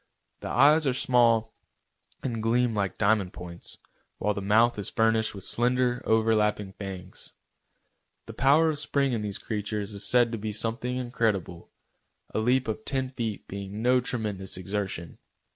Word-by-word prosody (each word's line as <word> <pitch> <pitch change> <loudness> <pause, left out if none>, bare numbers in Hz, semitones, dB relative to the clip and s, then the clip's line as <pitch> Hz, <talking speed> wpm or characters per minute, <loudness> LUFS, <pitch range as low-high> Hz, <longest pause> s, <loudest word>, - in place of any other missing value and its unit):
The - - -6
eyes 150 +4 +5
are 130 - +1
small 120 -5 +3 0.7
and 115 -4 -2
gleam 120 +1 +2
like 100 -3 -2
diamond 100 -3 +2
points, 85 -1 -9 0.4
while 105 - 0
the 100 - -4
mouth 110 +3 +3
is 100 - -3
furnished 110 -1 +1
with 100 - -7
slender, 125 +2 +1
overlapping 105 -3 +2
fangs. 95 -2 -8 0.9
The - - -9
power 150 +5 +4
of 150 - -3
spring 140 -3 +1
in 115 - -1
these 105 -2 -3
creatures 105 -1 -4
is 100 - -5
said 120 -2 +3
to 115 - -4
be 105 0 -4
something 115 +4 -2
incredible, 110 -8 -2 0.6
a - - 0
leap 125 +3 +2
of 110 0 -3
ten 130 0 -2
feet 115 -5 -4
being 100 +2 -6
no 125 +1 +4
tremendous 105 -7 -3
exertion. 95 -3 -4
110 Hz, 155 wpm, -27 LUFS, 100-125 Hz, 0.9 s, eyes